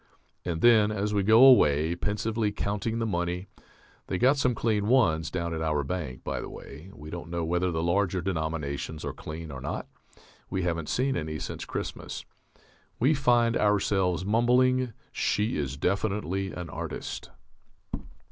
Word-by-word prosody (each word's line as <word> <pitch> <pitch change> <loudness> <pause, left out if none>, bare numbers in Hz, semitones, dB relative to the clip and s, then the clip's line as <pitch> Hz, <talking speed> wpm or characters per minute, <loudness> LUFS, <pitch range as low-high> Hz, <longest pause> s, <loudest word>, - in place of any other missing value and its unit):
_ 90 - -1
And 80 - -3
then, 110 -3 +6
as 105 0 -1
we 100 - +2
go 110 +5 +6
away, 80 - +6
pensively 105 +3 -1
counting 105 +2 -2
the 115 - 0
money 90 -2 -2 0.6
(they've 95 - -2
got 130 +3 +5
some 125 -4 +1
clean 105 -3 0
Ones 80 -11 +3
down 85 0 -3
at 80 - -3
our 75 -2 0
bank, 70 -4 -4
by - - -3
the - - -6
way; 75 +7 -10
we 75 -4 -11
don't 85 -1 -6
know 85 -1 -2
whether 90 +2 +1
the 80 -1 -1
larger 95 +1 +1
denominations 80 -4 -3
are - - -3
clean 80 0 -7
or 65 -2 -7
not, 70 - -4 0.6
we 95 - -1
haven't 85 -3 -2
seen 135 +2 +1
any 80 -1 -3
since - - -5
Christmas), - - -5 0.7
we 135 +7 +4
find 120 -4 +3
ourself 95 -4 +2
mumbling, 125 +3 +3 0.2
_She 105 +3 +1
is 70 -2 -2
definitely 95 +1 -1
an 90 -2 -6
artist. - - -5
95 Hz, 160 wpm, -28 LUFS, 80-110 Hz, 0.7 s, then